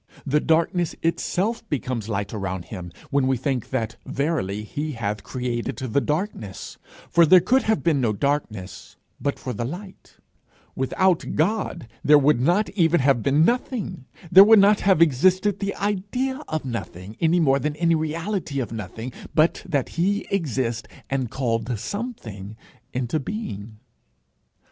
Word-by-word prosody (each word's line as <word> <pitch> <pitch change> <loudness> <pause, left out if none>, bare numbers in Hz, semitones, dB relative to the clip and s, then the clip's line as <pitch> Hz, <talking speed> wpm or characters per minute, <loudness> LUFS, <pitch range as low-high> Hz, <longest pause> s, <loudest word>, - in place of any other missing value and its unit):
The 150 +1 +2
darkness 165 +2 +1
itself 205 +7 -1
becomes 125 -5 -3
light 100 -1 -2
around 95 -4 -4
him 90 -5 -8 0.2
when 140 -2 +2
we 130 -1 +2
think 130 -1 -2
that 115 -3 -2
verily 130 - -2
he 150 +7 -4
hath 105 -3 -3
created 125 -2 -3
the 130 0 0
darkness, 150 - -4 0.3
for 170 - +5
there 180 +3 +8
could 255 +10 +3
have 220 -2 0
been 155 -5 +2
no 115 -3 +2
darkness 110 -5 -3 0.2
but 140 - -1
for 125 - -5
the 120 - -3
light 180 - -8 0.6
Without 175 +7 +1
God 175 - 0 0.2
there 150 0 +7
would 145 -3 +3
not 175 +10 +2
even 175 -3 +3
have 135 -3 +3
been 145 +6 +3
nothing; 230 - -2 0.3
there 190 +2 +11
would 220 +2 +7
not 205 +1 +5
have 190 -4 +5
existed 185 +7 +2
the 200 0 -2
idea 210 +8 -2
of 155 -3 -3
nothing, 105 -5 -6
any 165 +2 +3
more 140 -4 +3
than 150 +2 -2
any 170 +1 +2
reality 160 0 -2
of 125 - -3
nothing, 110 +3 -6 0.2
but 155 +2 +3
that 140 -4 0
he 195 +5 0
exists 130 - -1 0.2
and 130 -3 -1
called 115 -2 -1
something 110 - -6 0.3
into 125 +4 -1
being. 115 - -6
145 Hz, 150 wpm, -24 LUFS, 120-185 Hz, 0.6 s, there